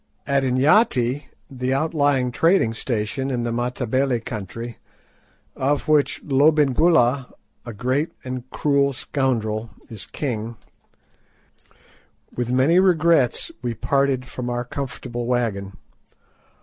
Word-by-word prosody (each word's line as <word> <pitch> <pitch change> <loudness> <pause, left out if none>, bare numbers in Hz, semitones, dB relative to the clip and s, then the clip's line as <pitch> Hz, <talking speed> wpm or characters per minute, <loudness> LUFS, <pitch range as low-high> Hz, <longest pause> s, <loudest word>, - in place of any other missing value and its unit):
At 140 0 +2
Inyati, 130 - +2 0.2
the 130 0 -2
outlying 145 -4 +1
trading 165 -5 +3
station 120 +3 -3
in 125 -3 -1
the 120 - -2
Matabele 125 +1 0
country, 115 +1 -7 0.8
of 140 +2 0
which 150 -2 +2
Lobengula 140 -2 +3 0.4
(a 120 - -5
great 130 +8 -1
and 130 0 -6
cruel 140 -1 +1
scoundrel) 115 -5 -2 0.2
is 110 -3 -9
king, 115 -5 -4 1.8
with 120 0 -2
many 135 +8 +4
regrets 170 -8 +3
we 120 -2 -3
parted 135 -1 0
from 125 -1 -5
our 120 0 -2
comfortable 125 -2 -5
wagon. 100 -7 -2
130 Hz, 105 wpm, -22 LUFS, 120-140 Hz, 1.8 s, many